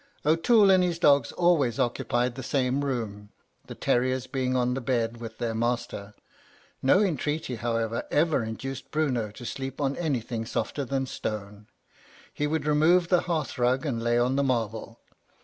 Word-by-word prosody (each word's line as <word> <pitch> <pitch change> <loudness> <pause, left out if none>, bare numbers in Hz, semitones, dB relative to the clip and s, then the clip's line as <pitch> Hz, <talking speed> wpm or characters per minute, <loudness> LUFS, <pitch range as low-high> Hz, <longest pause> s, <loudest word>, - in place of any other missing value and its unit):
"O'Toole 195 +7 +5
and 185 -1 +5
his 175 -2 0
dogs 140 -7 +4
always 155 -10 +2
occupied 120 0 0
the 130 - -7
same 130 +1 0
room, 110 -7 -4 0.4
the - - -8
terriers 130 +1 0
being 130 -2 -1
on 125 0 +1
the 130 - -3
bed 115 -2 -1
with 115 -1 -8
their 115 -1 -2
master. 115 -3 -2 0.7
No 160 +9 +4
entreaty, 150 - -1
however, 115 0 -2
ever 155 -4 +2
induced 125 +4 -6
Bruno 130 -8 0
to 120 +4 -11
sleep 135 +2 -5
on 140 -1 0
anything 120 -8 -2
softer 140 +4 -2
than 135 +1 -1
stone. 105 -3 -6 0.7
He 150 - -1
would 155 -1 -1
remove 165 +4 +3
the 180 -2 +4
hearth 160 -7 -3
rug 125 +4 +2
and 120 -6 -2
lay 120 0 +1
on 125 +3 +2
the 140 - +2
marble. 115 -3 -2
130 Hz, 165 wpm, -27 LUFS, 115-150 Hz, 0.7 s, O'Toole